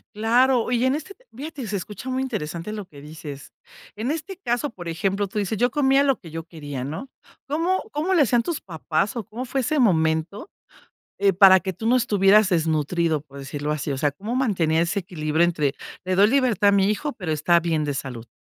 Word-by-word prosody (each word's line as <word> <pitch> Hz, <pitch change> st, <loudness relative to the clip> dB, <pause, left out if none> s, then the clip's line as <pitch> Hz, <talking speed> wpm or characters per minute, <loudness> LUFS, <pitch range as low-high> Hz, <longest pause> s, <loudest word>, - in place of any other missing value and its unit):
Claro, 240 Hz, +3 st, +3 dB
y 245 Hz, +1 st, +2 dB
en 260 Hz, -, +3 dB
este 345 Hz, +6 st, -5 dB, 0.2 s
fíjate 285 Hz, -2 st, -6 dB
se 205 Hz, -, -3 dB
escucha 210 Hz, +6 st, -6 dB
muy 260 Hz, 0 st, -1 dB
interesante 190 Hz, -6 st, -4 dB
lo 210 Hz, -3 st, -5 dB
que 140 Hz, -4 st, -14 dB
dices. 150 Hz, -2 st, -9 dB, 0.4 s
En 225 Hz, +6 st, -2 dB
este 335 Hz, +4 st, -5 dB
caso, 245 Hz, -5 st, -1 dB
por 175 Hz, -8 st, -10 dB
ejemplo, 195 Hz, +4 st, -1 dB
tú 210 Hz, +2 st, -3 dB
dices: 205 Hz, +1 st, -2 dB
"Yo 245 Hz, 0 st, +2 dB
comía 275 Hz, -1 st, +3 dB
lo 270 Hz, -2 st, +1 dB
que 170 Hz, -, -12 dB
yo 165 Hz, +1 st, -6 dB
quería", 145 Hz, -6 st, -7 dB
¿no? 160 Hz, -, -6 dB, 0.4 s
¿Cómo 335 Hz, +6 st, 0 dB
cómo 315 Hz, +6 st, -1 dB
le 335 Hz, -, +4 dB
hacían 240 Hz, -2 st, +3 dB
tus 335 Hz, -3 st, -3 dB
papás, 170 Hz, +4 st, -2 dB
o, 230 Hz, -, -3 dB
cómo 235 Hz, +7 st, -6 dB
fue 265 Hz, +2 st, -1 dB
ese 295 Hz, +4 st, 0 dB
momento, 165 Hz, -, +1 dB, 0.7 s
eh, 200 Hz, -1 st, +3 dB
para 190 Hz, 0 st, +7 dB
que 190 Hz, +2 st, -3 dB
tú 205 Hz, +6 st, -6 dB
no 245 Hz, +2 st, +4 dB
estuvieras 210 Hz, -3 st, +4 dB
desnutrido? 160 Hz, -1 st, +1 dB
Por 140 Hz, -2 st, -13 dB
decirlo 145 Hz, +2 st, -4 dB
así, 150 Hz, -1 st, -3 dB
o 135 Hz, -, -1 dB
sea, 145 Hz, +1 st, +1 dB
¿cómo 210 Hz, -, -5 dB
mantenía 170 Hz, -11 st, +1 dB
ese 170 Hz, +4 st, -1 dB
equilibrio 160 Hz, -3 st, 0 dB
entre 150 Hz, -5 st, 0 dB, 0.3 s
le 185 Hz, -, 0 dB
doy 200 Hz, +3 st, +5 dB
libertad 235 Hz, -5 st, +3 dB
a -, -, +5 dB
mi 200 Hz, 0 st, +3 dB
hijo, 290 Hz, +7 st, -2 dB
pero 175 Hz, -6 st, -3 dB
está 165 Hz, +3 st, +3 dB
bien 160 Hz, -2 st, 0 dB
de 145 Hz, -, -2 dB
salud? 125 Hz, -4 st, -6 dB
195 Hz, 210 wpm, -23 LUFS, 160-250 Hz, 0.7 s, para